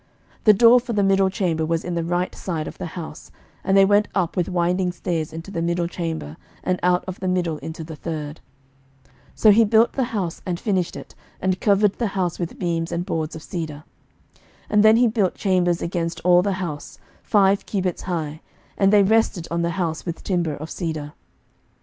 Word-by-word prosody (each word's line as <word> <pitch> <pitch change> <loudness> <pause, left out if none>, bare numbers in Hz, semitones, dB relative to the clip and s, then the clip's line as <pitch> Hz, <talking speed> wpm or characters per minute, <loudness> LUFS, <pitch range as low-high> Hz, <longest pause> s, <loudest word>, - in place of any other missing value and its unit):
11:006:008 - - -35
The 215 - +8
door 235 +4 +7
for 240 -1 -5
the 205 -2 +2
middle 195 0 +3
chamber 175 -4 -1
was 165 +1 -1
in 175 - -3
the 170 -1 -1
right 175 +2 -1
side 160 -5 -4
of - - -9
the - - -4
house: 160 -3 -8 0.3
and 195 0 +2
they 195 - +7
went 205 +1 +3
up 180 -4 0
with 180 -3 0
winding 180 +1 +1
stairs 165 -3 -3
into 165 +5 -8
the 170 -4 -3
middle 170 +1 0
chamber, 165 - -5 0.3
and 185 0 0
out 180 0 +2
of 185 - -6
the 185 - -3
middle 175 -4 0
into 160 0 -7
the 160 0 -8
third. 155 -1 -6 0.6
11:006:009 - - -30 0.2
So 215 - +6
he 225 +3 +6
built 220 +2 +4
the 265 - 0
house, 200 -9 -3
and 175 -2 -3
finished 190 -5 -1
it; - - -10 0.3
and 185 0 -1
covered 205 -1 +3
the 235 - +1
house 180 -2 -1
with 170 -2 -4
beams 170 -1 -2
and 175 +1 -2
boards 160 -4 -3
of 160 - -9
cedar. 155 -4 -5 0.5
11:006:010 - - -30 0.3
And 210 0 +4
then 220 +1 +7
he 245 0 +5
built 215 -5 0
chambers 180 -3 +1
against 170 -1 -2
all 175 0 +5
the 200 +1 0
house, 170 -6 -5 0.2
five 200 -2 +2
cubits 185 -4 -2
high: 160 -4 -4 0.4
and 195 0 +4
they 205 -1 +6
rested 200 -4 +1
on 170 0 0
the 170 - 0
house 170 -2 -2
with 170 -2 -6
timber 170 -5 -1
of 155 +3 -8
cedar. 155 -4 -4
180 Hz, 210 wpm, -22 LUFS, 165-195 Hz, 0.6 s, The